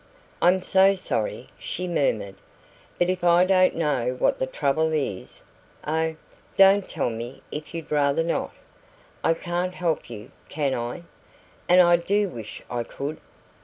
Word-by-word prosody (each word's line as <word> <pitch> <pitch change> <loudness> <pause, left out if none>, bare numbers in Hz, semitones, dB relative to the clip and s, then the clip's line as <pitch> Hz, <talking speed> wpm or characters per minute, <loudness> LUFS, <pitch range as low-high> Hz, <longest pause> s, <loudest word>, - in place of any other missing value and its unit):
"I'm 180 +1 +4
so 195 +1 +4
sorry!" 120 - -3
she 180 +1 -4
murmured. 110 - 0 0.6
"But 175 +1 +2
if 185 -1 -4
I 175 +1 +5
don't 185 -1 +4
know 135 -6 0
what - - +1
the 130 - 0
trouble 150 +4 0
is 135 -11 -3 0.4
oh, 160 +1 0 0.4
don't 195 0 +6
tell 140 -7 -1
me 115 +3 -7
if 150 +2 -7
you'd 165 -2 -7
rather 145 +1 +2
not! 165 - -1 0.7
I 165 - +3
can't 175 +2 -3
help 170 -7 -1
you, 105 -3 -9 0.2
can 145 -3 -1
I? 120 +8 -4 0.7
And 180 +1 +7
I 175 -1 +5
do 200 +3 0
wish 110 -9 -9
I 120 -1 -3
could!" 140 +6 -6
160 Hz, 150 wpm, -25 LUFS, 135-180 Hz, 0.7 s, And